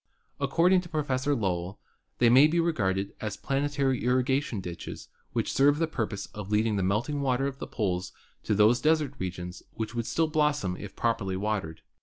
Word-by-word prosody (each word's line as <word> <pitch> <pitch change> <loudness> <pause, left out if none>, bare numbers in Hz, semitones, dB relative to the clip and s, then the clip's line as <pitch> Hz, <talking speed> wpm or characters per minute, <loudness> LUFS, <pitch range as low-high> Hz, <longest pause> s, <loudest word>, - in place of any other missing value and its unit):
According 170 +7 +3
to 175 - -12
Professor 145 -2 0
Lowell, 95 -4 -2 0.4
they 120 - +4
may 130 +5 +7
be 170 +2 +1
regarded 100 - 0
as 110 -2 -3
planetary 140 -2 0
irrigation 130 -1 +1
ditches 90 -3 -7 0.2
which - - -1
serve 145 +2 +4
the 165 - +2
purpose 110 -10 -3
of 105 -2 -7
leading 105 +1 +2
the 100 - 0
melting 110 +10 0
water 135 0 +1
of 135 -1 -4
the - - -5
poles 95 -5 -2 0.3
to 105 - 0
those 110 +4 +4
desert 155 -3 +2
regions 90 -1 -5
which 110 0 -4
would 115 -1 -3
still 165 - +1
blossom 150 - +1
if 100 0 -9
properly 105 -5 0
watered. 100 -6 -3
120 Hz, 175 wpm, -28 LUFS, 100-145 Hz, 0.4 s, may